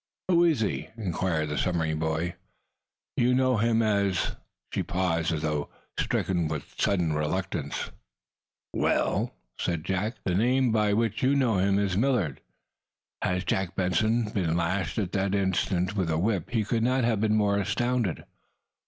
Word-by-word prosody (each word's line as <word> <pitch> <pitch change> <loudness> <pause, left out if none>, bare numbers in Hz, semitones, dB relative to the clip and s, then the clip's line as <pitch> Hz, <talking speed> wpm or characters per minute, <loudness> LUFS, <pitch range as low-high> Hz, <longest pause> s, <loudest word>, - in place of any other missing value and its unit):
"Who 170 -1 +5
is 155 -9 +2
he?" 105 - -1
inquired 85 -6 -1
the 75 -2 -1
submarine 80 -2 0
boy. 80 +2 -1 0.8
"You 125 +1 +3
know 130 -1 +3
him 115 +1 +2
as 100 -4 +1 0.2
" - - -28
She - - 0
paused, 85 -3 0
as 80 -1 -2
though 75 -2 -1 0.3
stricken 85 -4 0
with 75 -2 -5
sudden 90 -6 +1
reluctance. 75 -1 -2 0.8
"Well?" - - +1 0.3
"The 95 +7 -1 0.2
name 125 +4 +3
by 105 -2 +2
which 115 0 0
you 135 +2 +3
know 120 -8 +2
him 100 +1 +3
is 100 -2 +1
Millard." 110 - +1 0.8
Had 90 0 0
Jack 95 +1 -1
Benson 110 +5 +1
been 85 -5 0
lashed 90 +3 -1
at 95 -5 -1
that 100 0 0
instant 95 0 0
with 95 -4 0
a 80 - +1
whip 95 +1 0
he 115 -3 +1
could 115 +2 0
not 130 +2 +2
have 115 -3 +1
been 110 -1 +2
more 100 -1 +2
astounded. 115 0 0
95 Hz, 155 wpm, -27 LUFS, 85-110 Hz, 0.8 s, Who